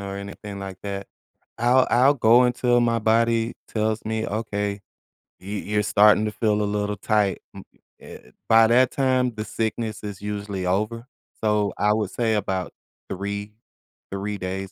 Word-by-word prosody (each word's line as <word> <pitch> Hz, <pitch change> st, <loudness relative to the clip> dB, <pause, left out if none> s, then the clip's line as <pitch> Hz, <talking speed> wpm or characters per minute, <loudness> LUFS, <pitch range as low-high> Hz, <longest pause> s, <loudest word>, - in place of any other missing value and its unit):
anything 100 Hz, +1 st, -7 dB
like 95 Hz, -1 st, -7 dB
that, 100 Hz, -1 st, -5 dB, 0.5 s
I'll 125 Hz, +2 st, +4 dB
I'll 130 Hz, +4 st, +5 dB
go 120 Hz, -1 st, +5 dB
until 125 Hz, 0 st, +2 dB
my 115 Hz, -1 st, +2 dB
body 115 Hz, +1 st, +1 dB
tells 110 Hz, 0 st, -1 dB
me, 110 Hz, 0 st, -2 dB
"Okay, 105 Hz, -2 st, -3 dB, 0.6 s
y 95 Hz, -, -13 dB
you're 105 Hz, +1 st, -1 dB
starting 105 Hz, +1 st, +5 dB
to 105 Hz, -, -2 dB
feel 105 Hz, 0 st, 0 dB
a -, -, +1 dB
little 105 Hz, -1 st, -2 dB
tight," 105 Hz, -2 st, 0 dB
m -, -, -9 dB, 0.4 s
eh 65 Hz, -, -13 dB, 0.2 s
by 115 Hz, 0 st, +7 dB
that 125 Hz, +2 st, +4 dB
time, 130 Hz, -2 st, +1 dB
the 105 Hz, -, -4 dB
sickness 110 Hz, -1 st, -3 dB
is 100 Hz, -2 st, -7 dB
usually 100 Hz, -2 st, -4 dB
over, 105 Hz, +6 st, -1 dB, 0.4 s
so 105 Hz, -1 st, +1 dB
I 105 Hz, 0 st, +3 dB
would 105 Hz, -3 st, -1 dB
say 115 Hz, -2 st, 0 dB
about 95 Hz, -3 st, -2 dB, 0.4 s
3, 100 Hz, +2 st, -5 dB, 0.6 s
3 100 Hz, +1 st, -3 dB
days 95 Hz, +1 st, -4 dB
105 Hz, 155 wpm, -23 LUFS, 100-115 Hz, 0.6 s, by